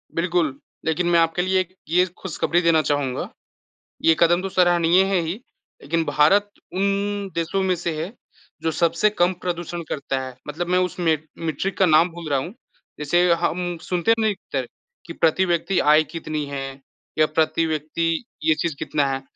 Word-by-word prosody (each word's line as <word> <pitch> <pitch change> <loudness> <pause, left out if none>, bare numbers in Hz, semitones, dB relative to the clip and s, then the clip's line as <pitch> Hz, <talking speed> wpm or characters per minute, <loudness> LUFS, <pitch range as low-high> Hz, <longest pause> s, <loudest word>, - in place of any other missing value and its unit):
बिल्कुल, 165 -5 0 0.3
लेकिन 165 +2 0
मैं 170 - +4
आपके 165 +1 +2
लिए 185 +1 +2
एक 185 0 -3 0.2
ये 180 +2 +4
खुशखबरी 175 -1 0
देना 165 -2 +4
चाहूँगा, 145 -4 -1 0.7
ये 165 - +5
कदम 175 +1 +4
तो 195 - -3
सराहनीय 175 0 +4
हैं 195 -2 +1
ही, 165 +1 -2 0.5
लेकिन 165 +2 0
भारत 200 +8 +3 0.2
उन 200 +1 -1
देशों 170 +4 -1
में 185 -1 +2
से 170 0 -3
है, 175 +5 -5 0.5
जो 165 - 0
सबसे 170 +6 +2
कम 180 -3 +1
प्रदूषण 175 -1 -3
करता 140 -2 -2
है। 130 -1 -7
मतलब 165 +4 -4
मैं 180 0 +2
उस 180 0 -2
मे 160 -3 +2 0.2
मेट्रिक 165 +4 -3
का 190 - +4
नाम 160 +2 +5
भूल 165 -2 -8
रहा 140 -2 +2
हूँ, 170 +9 -6 0.5
जैसे 175 +4 +3
हम 175 +1 -1
सुनते 180 +6 +1
नहीं 220 -2 +1 0.2
थे - - +2 0.4
कि - - -7
प्रति 170 +3 +2
व्यक्ति 175 +2 +1
आय 150 +1 +5
कितनी 155 -2 -3
हैं? 135 -1 -6 0.4
या 155 - +6
प्रति 160 +1 +1
व्यक्ति 160 +4 -1 0.2
ये 155 -1 +4
चीज़ 165 -1 -2
कितना 145 -2 0
है? 135 - -3
170 Hz, 175 wpm, -22 LUFS, 155-180 Hz, 0.7 s, या